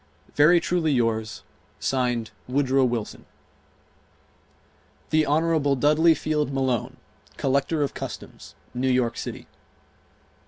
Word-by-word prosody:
Very 160 +4 +5
truly 170 -3 0
yours, 115 -4 -1 0.4
(Signed) 125 -4 -1 0.2
WOODROW 135 0 +2
WILSON. 120 -3 -4 1.9
Hon. 155 -1 +2
Dudley 155 +4 +4
Field 150 -1 -1
Malone, 130 -3 -1 0.4
Collector 140 +3 0
of 140 - -3
Customs, - - -8 0.2
New 130 +2 0
York 125 -2 +1
City. - - -6
140 Hz, 90 wpm, -24 LUFS, 125-155 Hz, 1.9 s, Very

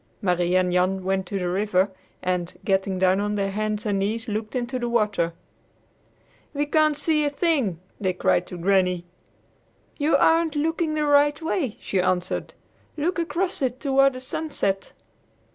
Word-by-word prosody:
Marie 180 -3 +1
and 180 -1 +2
Jan 185 +1 +1
went 190 0 -1
to 200 - -3
the 180 -2 -2
river, 190 +1 +1 0.3
and, 180 -1 -1
getting 190 -1 +1
down 185 +1 +3
on 205 0 -1
their 195 -1 -1
hands 215 +2 -2
and 205 -2 0
knees, 220 +4 -2
looked 215 +2 -4
into 250 +1 -2
the 240 -1 -2
water. 210 -7 +1 1.2
"We 290 +1 +1
can't 305 0 +2
see 305 0 +1
a 290 - +2
thing!" 280 - 0 0.2
they 190 -2 0
cried 180 0 +1
to 180 - -7
Granny. 180 -1 +2 0.9
"You 295 +2 +3
aren't 325 -1 +3
looking 320 +1 0
the 305 -1 +1
right 290 +1 +4
way," 320 - -2
she 190 - -1
answered. 180 0 -1 0.4
"Look 345 +4 0
across 340 +3 -2
it 255 -1 -1
toward 275 -1 +3
the 255 - -7
sunset." 255 -8 -3
215 Hz, 160 wpm, -24 LUFS, 190-290 Hz, 1.2 s, right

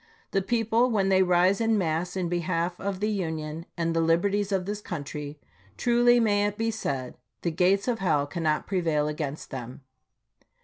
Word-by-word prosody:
The 195 - +1
people, 225 +4 +2
when 200 -4 +1
they 190 -1 +4
rise 185 +3 +3
in 225 -1 +2
mass 175 0 -1
in 180 -2 -1
behalf 175 0 -1
of 195 -1 -3
the 210 - +1
Union 160 -4 -4
and 165 -1 0
the 165 - +3
liberties 195 +5 +1
of 190 -2 0
this 205 +1 -4
country, 150 -4 -6 0.4
truly 240 0 +4
may 205 -2 +3
it 205 0 -5
be 225 0 0
said, 135 - -4
" 110 -2 -53
The 170 - 0
gates 190 +5 +2
of 240 -2 0
hell 155 -7 +2
cannot 155 0 -1
prevail 165 -6 0
against 150 -1 -4
them." 125 +1 -7
180 Hz, 180 wpm, -27 LUFS, 160-205 Hz, 0.4 s, they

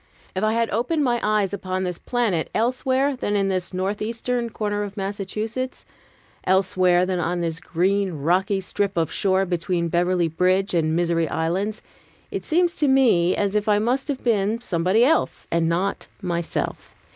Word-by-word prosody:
If 190 - -1
I 215 0 +2
had 230 0 0
opened 250 +9 0
my 240 -3 +1
eyes 210 -2 +1
upon 185 -1 -3
this 180 -2 -3
planet 225 -10 0
elsewhere 260 +4 +1
than 210 -5 -2
in 195 -1 +1
this 185 -2 -2
northeastern 225 +5 -2
corner 205 -2 -2
of 205 0 -5
Massachusetts, 210 +6 -4 0.6
elsewhere 185 -1 +3
than 185 -1 -1
on 175 +1 -1
this 165 -1 -2
green, 190 +1 0
rocky 180 +6 +1
strip 200 0 -2
of 165 -2 +1
shore 190 -1 +1
between 175 -1 -1
Beverly 175 0 +2
Bridge 185 +4 +1
and 165 -2 +2
the - - 0
Misery 170 -1 +1
Islands, 190 +7 -2 0.5
it - - -3
seems 345 +1 +2
to 295 - +2
me 230 -10 +4
as 200 -1 0
if 210 +1 0
I 205 - +4
must 245 +6 0
have 280 -3 -3
been 220 -1 +1
somebody 185 0 +2
else, 320 +4 +1
and 165 -1 +2
not 185 +4 -1
myself. 170 -2 -3
195 Hz, 170 wpm, -23 LUFS, 180-225 Hz, 0.6 s, me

